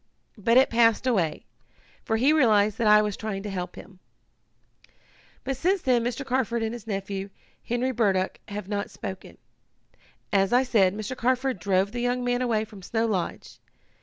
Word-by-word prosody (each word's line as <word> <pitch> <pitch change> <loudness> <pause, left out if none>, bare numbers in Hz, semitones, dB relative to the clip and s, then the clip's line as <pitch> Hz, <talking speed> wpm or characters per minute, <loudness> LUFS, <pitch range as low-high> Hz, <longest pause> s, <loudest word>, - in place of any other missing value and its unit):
But 230 +4 +3
it 265 - +5
passed 230 +1 +3
away, 190 -11 0 0.6
for 225 - 0
he 270 +7 +4
realized 215 -7 +3
that 230 - +2
I 210 0 +7
was 210 -2 -2
trying 205 -3 -5
to 205 - -5
help 180 -2 -5
him. 185 0 -13 1.4
"But 270 +1 -2
since 370 +6 +1
then 245 -3 +2
Mr. 245 +3 -3
Carford 245 -3 0
and 220 +1 -2
his 235 -2 -9
nephew, 195 -1 -4 0.3
Henry 245 +2 -1
Burdock, 195 -6 0
have 205 -2 -6
not 205 -1 -3
spoken. 190 0 -8 1.0
As 195 +2 +2
I 250 +2 +5
said, 205 -7 +2
Mr. 215 +4 -5
Carford 255 -2 0
drove 190 +2 +1
the 240 +1 -4
young 245 +1 0
man 245 0 0
away 225 -3 0
from 210 -3 -13
Snow 225 +5 -1
Lodge. 190 -6 -3
220 Hz, 170 wpm, -26 LUFS, 200-245 Hz, 1.4 s, I